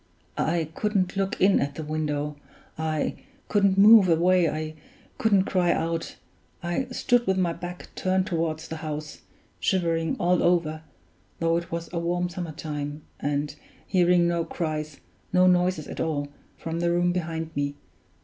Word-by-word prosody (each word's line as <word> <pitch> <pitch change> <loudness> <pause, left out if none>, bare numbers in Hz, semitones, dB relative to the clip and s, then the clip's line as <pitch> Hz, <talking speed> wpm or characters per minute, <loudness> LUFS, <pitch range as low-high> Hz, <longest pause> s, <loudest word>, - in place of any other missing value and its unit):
I 160 -1 0
couldn't 200 -3 0
look 195 +3 -1
in 195 +1 +5
at 140 0 -2
the 160 - -5
window 150 -1 -2 0.4
I 160 -1 -1 0.3
couldn't 200 -2 +3
move 205 -1 +8
away 175 +1 +4
I 155 0 -4 0.5
couldn't 200 -4 +4
cry 180 -3 +2
out; 165 0 -2 0.5
I 175 +10 -1
stood 245 -1 +1
with 190 0 +2
my 175 -3 +1
back 180 +1 -8
turned 185 0 +1
toward 165 -3 -1
the 160 0 -7
house, 155 -1 -6 0.4
shivering 165 -4 +1
all 180 +1 +3
over, 165 -3 +1 0.6
though 165 0 +1
it 170 0 -3
was 170 0 -3
a 170 - 0
warm 175 +1 -1
summer 175 -2 -5
time, 150 -1 -5 0.2
and 145 0 -2 0.3
hearing 180 -2 +3
no 170 -1 +1
cries, 155 -4 -4 0.3
no 185 0 +5
noises 180 -3 +2
at - - -7
all, 145 -3 -1 0.3
from 165 0 -4
the 170 0 +1
room 175 +1 +2
behind 165 -2 -3
me. 145 0 -1
170 Hz, 155 wpm, -26 LUFS, 155-180 Hz, 0.6 s, move